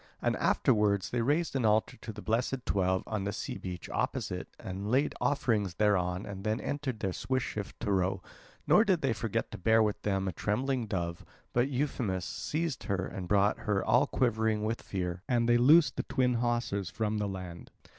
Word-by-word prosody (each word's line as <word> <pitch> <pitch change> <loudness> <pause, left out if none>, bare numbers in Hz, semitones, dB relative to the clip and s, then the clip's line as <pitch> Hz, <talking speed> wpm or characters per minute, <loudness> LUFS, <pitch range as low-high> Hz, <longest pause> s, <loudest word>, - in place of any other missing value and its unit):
And - - +1
afterwards 105 -3 +2
they 120 - 0
raised 150 +6 +1
an 130 - +1
altar 110 0 +2
to 110 - -7
the 105 -1 -9
blessed 125 +3 -1
twelve 95 -1 +1
on 110 -3 -3
the 100 - -1
sea - - -5
beach 90 -2 -6
opposite - - -2
and 95 +2 -5
laid 135 +5 +2
offerings 110 -10 +1
thereon 95 -3 +1
and 100 -1 -7
then 110 +2 0
entered 135 -6 -3
their 95 -2 -1
swift 130 +4 -1
ship 105 -4 -4
to 105 - -1
row, 95 -1 +1 0.4
nor - - +6
did - - +2
they - - +2
forget - - -2
to - - -7
bear 110 +3 +4
with 105 -1 -1
them 95 -1 0
a - - 0
trembling 125 - -1
dove; 85 -4 -3 0.3
but 120 +3 +2
Euphemus 125 - -1
seized 160 -1 -3
her 95 -2 -1
and 95 -2 -6
brought 100 +2 +3
her 100 -2 0
all 125 +5 +4
quivering 110 -5 +1
with 110 +2 -2
fear, 90 -2 -3
and 120 -2 +2
they 120 0 +5
loosed 150 +6 +6
the - - +1
twin 125 -2 +1
hawsers 120 -6 -1
from 110 -1 -1
the 105 - 0
land. 90 -3 -7
105 Hz, 195 wpm, -30 LUFS, 95-120 Hz, 0.4 s, nor